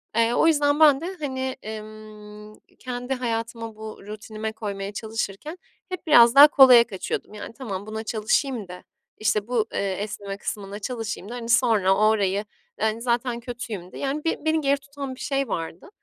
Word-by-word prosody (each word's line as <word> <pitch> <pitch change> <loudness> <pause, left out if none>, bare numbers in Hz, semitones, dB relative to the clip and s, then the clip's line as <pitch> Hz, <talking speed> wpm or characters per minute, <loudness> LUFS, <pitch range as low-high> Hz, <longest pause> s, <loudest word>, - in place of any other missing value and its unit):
Eee, 230 +1 +3
o 325 - +3
yüzden 290 -1 +3
ben 295 -2 +6
de 370 +3 -5
hani, 260 -2 -3 0.2
ımm, 215 0 -12 0.2
kendi 250 +1 -4
hayatıma 230 -2 -4
bu 220 0 -9
rutinime 215 +1 -6
koymaya 200 -2 -5
çalışırken 220 - -5 0.3
hep 370 -2 -6
biraz 235 -4 +7
daha 290 +2 +11
kolaya 255 -5 +8
kaçıyordum. 195 0 -5
Yani 210 +2 -8
tamam 205 -7 -6
buna 220 +1 -5
çalışayım 220 +1 -1
da 180 0 -10 0.3
işte 215 0 0
bu, 235 -3 +1
eee, 195 -1 -1
esneme 200 0 -5
kısmına 205 -1 -5
çalışayım 220 -3 -5
da 245 - -6
hani, 235 -1 -6
sonra 220 -6 +4
orayı 210 -1 +2 0.5
zaten 240 0 -1
kötüyüm 230 -7 -7
de - - -10
yani 280 +2 -2
be 320 -1 -2
beni 315 0 +2
geri 280 0 +2
tutan 275 -2 -7
bir - - -17
şey 275 -2 -1
vardı, 165 - -5
225 Hz, 165 wpm, -24 LUFS, 210-260 Hz, 0.5 s, daha